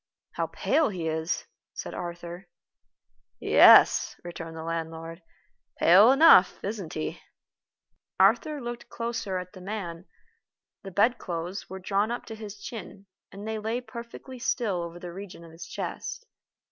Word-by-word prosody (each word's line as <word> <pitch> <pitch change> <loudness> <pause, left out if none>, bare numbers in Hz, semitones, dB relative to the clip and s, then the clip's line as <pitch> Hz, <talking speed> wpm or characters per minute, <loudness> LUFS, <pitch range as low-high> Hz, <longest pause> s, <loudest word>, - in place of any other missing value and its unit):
"How - - -2
pale 315 -2 +1
he 175 -5 -4
is," 160 +1 -2 0.3
said - - -6
Arthur. 175 +1 -7 0.9
"Yes," - - +7
returned 165 -2 -7
the 160 - -6
landlord, 165 +1 -5 0.6
"pale 195 +8 +7
enough, 275 - +7
isn't 200 -5 -4
he?" 75 - -4 1.0
Arthur 235 +10 +3
looked 240 -2 -7
closer 230 -5 -3
at 180 +1 -7
the 185 - -11
man. 185 -3 -6 0.7
The 195 - -8
bedclothes 190 -3 -1
were 190 - -6
drawn 195 +3 0
up 240 - -4
to 225 - -7
his 210 -2 -9
chin, 200 -1 -8 0.3
and 200 +2 -8
they 220 0 -2
lay 220 +3 -2
perfectly 240 +2 -10
still 230 -7 -1
over 170 0 -6
the 175 -1 -8
region 190 -2 -9
of 165 - -13
his 165 +1 -10
chest. 420 +3 -5
195 Hz, 140 wpm, -27 LUFS, 170-225 Hz, 1.0 s, Yes